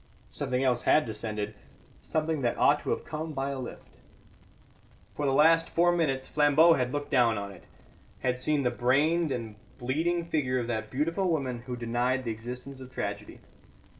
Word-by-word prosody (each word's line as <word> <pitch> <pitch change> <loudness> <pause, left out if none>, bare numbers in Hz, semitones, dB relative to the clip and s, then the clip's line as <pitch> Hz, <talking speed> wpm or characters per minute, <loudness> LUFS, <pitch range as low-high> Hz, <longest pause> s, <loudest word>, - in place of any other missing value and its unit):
Something 125 +1 -1
else 125 -2 +2
had 155 - +4
descended; 105 -1 -4 0.5
something 155 -1 -1
that 120 -2 0
ought - - +4
to - - -5
have - - -1
come 155 0 -5
by 135 0 -2
a 135 - -4
lift. 125 - -9 1.2
For 145 - -2
the - - +2
last 165 +4 +4
four 175 +1 +3
minutes 140 -6 0
Flambeau 150 +3 +5
had 125 -4 0
looked 145 0 -4
down 120 -5 +4
on 100 0 -5
it; 95 - -14 0.6
had 125 0 0
seen 145 +2 0
the 125 - +1
brained 145 +7 +2
and 115 -4 -4 0.2
bleeding 165 +7 -1
figure 140 -6 0
of 120 - -1
that 110 -2 -3
beautiful 165 - 0
woman 135 -7 -1
who 125 - -3
denied 120 +2 0
the 115 - -2
existence 125 +4 -8
of 130 - -9
tragedy. 100 -2 -5
130 Hz, 175 wpm, -28 LUFS, 120-155 Hz, 1.2 s, Flambeau